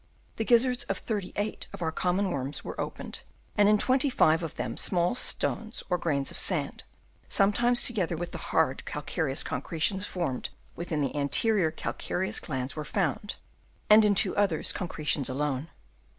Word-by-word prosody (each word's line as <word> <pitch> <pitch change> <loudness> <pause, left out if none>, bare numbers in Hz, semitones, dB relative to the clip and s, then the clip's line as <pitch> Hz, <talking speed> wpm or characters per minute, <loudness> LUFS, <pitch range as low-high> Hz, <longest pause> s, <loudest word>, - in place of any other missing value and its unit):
The 225 - -1
gizzards 245 +1 +4
of - - -2
thirty 205 -5 -3
eight 205 +1 -2
of - - -5
our 160 - 0
common 185 +3 0
worms 140 0 -3
were - - -5
opened, - - -5 0.4
and 205 -1 +5
in 210 - +5
twenty 260 +5 +2
five 160 -9 +4
of 165 -3 -5
them - - -3
small 175 +1 +3
stones 230 -2 0
or 180 - +2
grains 140 -5 0
of - - -6
sand, - - -1 0.4
sometimes 240 +5 +3
together 185 -8 +1
with 175 +1 -4
the 165 - -5
hard 155 -5 +1
calcareous 150 -1 -2
concretions 170 +8 -1
formed 165 -9 -3 0.3
within 165 -3 -2
the 140 0 -1
anterior 160 - +2
cal 160 - -4
ciferous 190 +1 -1
glands, 130 -3 -3
were 155 - -4
found, 180 +4 -1 0.6
and 215 +1 +9
in 205 -1 +4
two 190 0 +3
others 195 -6 +1
concretions 155 -6 -2
alone. 140 +2 -2
175 Hz, 165 wpm, -28 LUFS, 150-205 Hz, 0.6 s, and